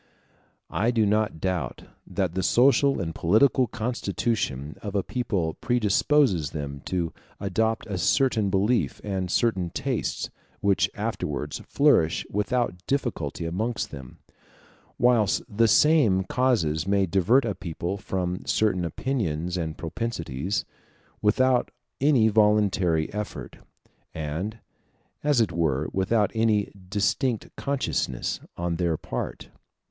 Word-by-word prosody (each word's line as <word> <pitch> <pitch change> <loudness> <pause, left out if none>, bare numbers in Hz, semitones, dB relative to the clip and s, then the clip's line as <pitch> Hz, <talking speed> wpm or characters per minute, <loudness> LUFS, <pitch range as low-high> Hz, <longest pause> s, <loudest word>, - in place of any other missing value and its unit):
I 115 - +1
do 115 -3 +2
not 105 -4 +1
doubt 90 -9 -2 0.2
that 95 -4 -1
the 95 - -1
social 135 +6 +4
and 80 -4 -3
political 125 - +3
constitution 110 - -2
of 105 -2 -5
a 100 - +1
people 100 -10 -1
predisposes 115 - +2
them 70 -2 -6
to 85 -3 -2 0.3
adopt 110 +3 0
a 100 -4 -4
certain 110 +3 +2
belief 105 +5 +1
and 95 -3 -2
certain 95 -3 +1
tastes, - - -2 0.3
which 100 -1 +2
afterwards 75 0 -3
flourish 140 - +3
without 105 -2 -1
difficulty 105 - -2
amongst 105 +7 -2
them; 65 -4 -10 0.8
whilst 115 -5 +3
the 115 +2 +2
same 115 -8 +4
causes 95 -9 +1
may 100 0 +3
divert 100 +9 +3
a 105 - -1
people 90 +1 -4
from 90 -2 -3
certain 100 -5 +1
opinions 85 - -2
and 80 -3 -3
propensities, 85 - -3 0.6
without 125 +4 +3 0.3
any 135 -5 +4
voluntary 100 -7 +2
effort, 105 0 -6 0.6
and, 80 +8 -3 0.7
as 145 -3 +3
it 110 -6 +2
were, 80 -4 0
without 100 +2 +1
any 110 -2 +1 0.2
distinct 105 +4 0
consciousness, 135 - -2 0.2
on 85 -1 -2
their 85 -3 0
part. - - -5
100 Hz, 115 wpm, -26 LUFS, 85-115 Hz, 0.8 s, social